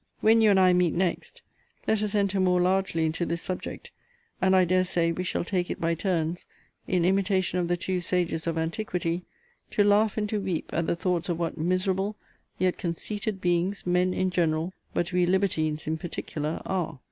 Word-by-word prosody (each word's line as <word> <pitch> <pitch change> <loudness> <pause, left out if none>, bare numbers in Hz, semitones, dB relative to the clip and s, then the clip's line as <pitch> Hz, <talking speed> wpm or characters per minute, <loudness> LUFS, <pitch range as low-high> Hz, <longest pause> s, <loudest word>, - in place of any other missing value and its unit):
When 225 +1 +5
you 220 - +6
and 195 -2 +5
I 185 -1 +5
meet 180 -2 +2
next, 180 -1 -2 0.4
let 220 -1 +2
us 210 -1 -1
enter 200 -1 +1
more 180 -1 +3
largely 180 -2 +1
into 160 +2 -1
this 170 0 -2
subject: 185 -1 -5 0.5
and, 190 0 +4
I 185 -1 +5
dare 185 +1 +3
say, 170 -2 +1
we 180 +2 -3
shall 185 - -1
take 180 -1 -1
it - - -4
by 165 0 +1
turns, 170 -1 -1 0.4
in 180 -2 +1
imitation 190 -1 +1
of 175 - 0
the 175 0 0
two 180 +1 -2
sages 175 -2 0
of 165 -1 -1
antiquity, 170 +1 -2 0.4
to 205 - +2
laugh 205 +1 +3
and 210 -1 0
to 210 -1 -1
weep 185 -4 -3
at 165 0 0
the - - +1
thoughts 175 0 -1
of 170 - 0
what 165 -2 -3
miserable, 185 +4 0 0.4
yet 185 -1 0
conceited 200 +4 -3
beings, 180 +2 0
men 180 +1 +2
in 185 0 0
general, 165 0 0 0.2
but 175 +2 -2
we 180 -1 +3
libertines 160 -5 0
in 160 +1 -2
particular, 155 -2 -4
are. 180 -6 -2
180 Hz, 195 wpm, -27 LUFS, 170-190 Hz, 0.5 s, you